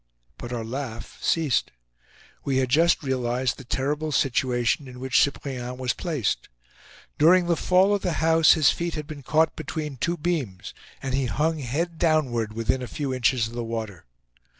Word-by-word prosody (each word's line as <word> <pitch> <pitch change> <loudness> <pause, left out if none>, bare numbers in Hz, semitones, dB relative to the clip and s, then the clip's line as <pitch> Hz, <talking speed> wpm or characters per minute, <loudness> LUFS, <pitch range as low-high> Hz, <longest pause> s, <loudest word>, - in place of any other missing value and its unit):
But 120 - -7
our 115 -2 -3
laugh 125 -1 -6
ceased. 155 -6 +1 0.7
We 135 -2 0
had 130 -1 +1
just 165 +5 +3
realized 125 -1 -1
the - - -9
terrible 145 +5 -2
situation 125 0 +1
in 125 0 -10
which 130 0 +2
Cyprien 125 -3 -4
was 130 -1 -1
placed. 145 - -2 0.7
During 175 +4 +6
the 170 -1 +2
fall 185 +4 +3
of 200 - 0
the 175 - -1
house 160 0 +5
his 155 -5 +4
feet 170 -1 -3
had 150 -1 -4
been 150 -2 -8
caught 155 +4 +2
between 150 -2 -5
two 170 +8 -1
beams, 145 - -3 0.3
and 135 -2 -3
he 135 -1 +1
hung 160 +5 0
head 160 +6 -3
downward 130 -10 +1
within 115 +3 0
a 125 - -4
few 140 -1 -3
inches 125 -1 +2
of 115 - -11
the 120 0 -3
water. 110 -5 -5
135 Hz, 175 wpm, -25 LUFS, 125-160 Hz, 0.7 s, During